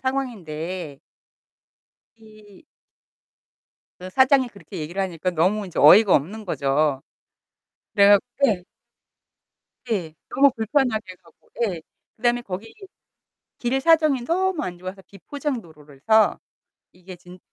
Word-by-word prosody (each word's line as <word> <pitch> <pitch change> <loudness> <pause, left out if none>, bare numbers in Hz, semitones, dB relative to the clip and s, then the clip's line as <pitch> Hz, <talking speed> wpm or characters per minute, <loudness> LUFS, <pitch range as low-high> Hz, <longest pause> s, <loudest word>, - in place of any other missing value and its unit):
상황인데 185 - -4 1.2
이 215 +2 -18 1.3
그 185 +1 -8
사장이 260 +3 +3
그렇게 200 -9 -12
얘기를 170 +6 -4
하니까 185 -1 -2
너무 185 +6 +1
인제 180 - -10
어이가 200 +7 +7
없는 205 +9 -3
거죠. 140 -3 0 0.9
그래 200 0 +6
갖 205 -1 +7 0.3
예. 195 -7 0 1.3
예. 175 -7 -2 0.2
너무 280 -1 +5
불편하게 220 -4 -1
가고 165 - -25
예 180 -7 -2 0.4
그다음에 240 +1 +1
거기 200 0 -8 0.9
길 255 +2 -1
사정이 310 -4 +3
너무 360 +2 0
안 175 -1 -5
좋아서 185 +2 -8
비포장도로라서 200 - -1 0.5
이게 180 0 -12
진 180 +1 -15
200 Hz, 235 characters per minute, -23 LUFS, 175-240 Hz, 1.3 s, 어이가